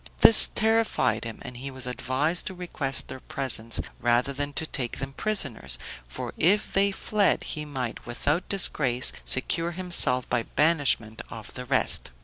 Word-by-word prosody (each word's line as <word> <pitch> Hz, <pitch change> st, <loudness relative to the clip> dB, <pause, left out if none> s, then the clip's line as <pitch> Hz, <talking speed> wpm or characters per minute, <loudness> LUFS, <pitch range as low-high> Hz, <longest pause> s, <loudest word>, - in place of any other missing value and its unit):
This 225 Hz, -, +10 dB
terrified 220 Hz, -, +1 dB
him, 115 Hz, -1 st, -6 dB
and 125 Hz, -1 st, -9 dB
he 135 Hz, +3 st, -6 dB
was 130 Hz, -2 st, -6 dB
advised 130 Hz, +7 st, -1 dB
to 190 Hz, -, -5 dB
request 155 Hz, -7 st, -2 dB
their 130 Hz, -, -8 dB
presence 120 Hz, -4 st, -2 dB, 0.2 s
rather 120 Hz, +3 st, +1 dB
than 145 Hz, +1 st, -3 dB
to 160 Hz, -, -1 dB
take 130 Hz, -6 st, -4 dB
them 135 Hz, 0 st, -6 dB
prisoners, 155 Hz, -, -2 dB, 0.3 s
for 60 Hz, -, -6 dB
if 200 Hz, +6 st, +2 dB
they 200 Hz, +1 st, +3 dB
fled, 205 Hz, 0 st, +1 dB
he 150 Hz, -1 st, -5 dB
might 130 Hz, -5 st, -5 dB
without 145 Hz, +8 st, -1 dB
disgrace, 135 Hz, -10 st, +1 dB
secure 165 Hz, +6 st, +2 dB
himself 170 Hz, -8 st, +1 dB
by 120 Hz, -, 0 dB
banishment 140 Hz, -6 st, 0 dB
of 110 Hz, -2 st, -10 dB
the 125 Hz, -, -7 dB
rest. -, -, +1 dB
135 Hz, 155 wpm, -26 LUFS, 125-175 Hz, 0.3 s, This